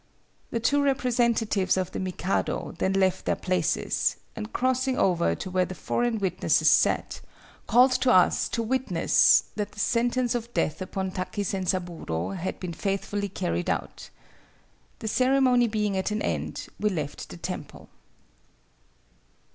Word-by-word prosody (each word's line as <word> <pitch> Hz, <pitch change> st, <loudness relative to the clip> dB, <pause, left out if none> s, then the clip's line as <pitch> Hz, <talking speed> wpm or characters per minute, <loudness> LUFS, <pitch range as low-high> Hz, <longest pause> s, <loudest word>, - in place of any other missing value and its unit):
"The 230 Hz, -, -2 dB
two 285 Hz, +5 st, +2 dB
representatives 235 Hz, -8 st, +1 dB
of 185 Hz, -1 st, -1 dB
the -, -, -4 dB
Mikado 185 Hz, 0 st, -2 dB
then 190 Hz, -, +1 dB
left 190 Hz, -1 st, +1 dB
their -, -, +1 dB
places, 180 Hz, -3 st, 0 dB, 0.2 s
and 105 Hz, -, -6 dB
crossing 260 Hz, 0 st, 0 dB
over 175 Hz, -2 st, +2 dB
to 185 Hz, -, -7 dB
where 185 Hz, 0 st, +2 dB
the 185 Hz, -, -7 dB
foreign 240 Hz, +3 st, -1 dB
witnesses 190 Hz, -2 st, +2 dB
sat, -, -, +2 dB, 0.5 s
called 250 Hz, +2 st, +5 dB
to 255 Hz, -, +4 dB
us 185 Hz, -1 st, +4 dB
to 230 Hz, -, -1 dB
witness 235 Hz, -8 st, +3 dB
that 210 Hz, -1 st, -3 dB
the 205 Hz, -, -11 dB
sentence 240 Hz, +3 st, +1 dB
of 240 Hz, -1 st, -4 dB
death 155 Hz, -, 0 dB
upon 190 Hz, 0 st, -3 dB
Taki 185 Hz, +2 st, -3 dB
Zenzaburo 175 Hz, -, -2 dB
had 185 Hz, -1 st, -4 dB
been 180 Hz, -2 st, -5 dB
faithfully 200 Hz, +2 st, -2 dB
carried 85 Hz, -, -2 dB
out. -, -, -4 dB, 0.9 s
The 220 Hz, -, -6 dB
ceremony 255 Hz, 0 st, +3 dB
being 210 Hz, -2 st, -1 dB
at 190 Hz, +2 st, -1 dB
an 210 Hz, 0 st, -2 dB
end, -, -, -3 dB
we 210 Hz, -, +2 dB
left 155 Hz, -7 st, -5 dB
the 85 Hz, -, -9 dB
temple." -, -, -7 dB
200 Hz, 145 wpm, -26 LUFS, 185-240 Hz, 0.9 s, called